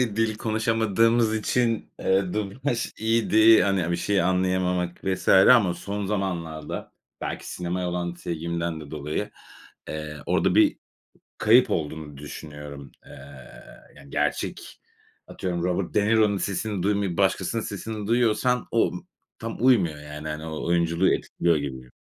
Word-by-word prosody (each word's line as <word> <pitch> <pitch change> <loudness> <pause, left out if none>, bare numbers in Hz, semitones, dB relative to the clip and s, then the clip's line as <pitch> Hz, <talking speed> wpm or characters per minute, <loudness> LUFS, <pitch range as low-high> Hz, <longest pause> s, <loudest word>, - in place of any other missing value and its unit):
hani, 115 -4 0
dil 115 -1 +1
konuşamadığımız 115 0 +2
için, 115 +1 0
eee, 95 -1 +1
dublaj 115 +5 -2
iyiydi, 110 0 +5
hani, 95 -4 +1
a 85 - -2
bir 85 - +1
şey 100 +2 +1
anlayamamak 90 -1 0
vs. 95 -1 -2
ama 95 -1 +6
son 100 +3 -4
zamanlarda, 85 -7 -4 0.3
belki - - -5
sinemaya 90 0 -3
olan 85 0 -3
sevgimden 85 -1 -3
de 75 -2 -11
dolayı, 75 0 -4 0.6
eee, 75 -1 -5
orada - - +2
bir - - +4 0.6
kayıp 120 +2 +5
olduğunu 75 -4 -3
düşünüyorum. 75 -1 -9
Eee, - - -14 0.8
yani, 70 - -15
gerçek, - - -3 0.5
atıyorum 90 -2 -3
Robert 90 +1 -1
De 105 - +2
Niro'nun 105 -2 +3
sesini 100 0 -2
duymayıp 100 -3 0
başkasının 100 +3 +1
sesini 105 +1 -5
duyuyorsan 120 +1 +2
o 115 - +3
ımm, 90 - -9 0.3
tam 115 0 -5
uymuyor, 90 - +3
yani. 75 +1 -8
Hani, 75 +1 -5
o 80 -1 -5
oyunculuğu 85 +1 +2
etkiliyor 85 -1 0
gibi. 65 -3 -6
95 Hz, 135 wpm, -25 LUFS, 85-110 Hz, 0.8 s, ama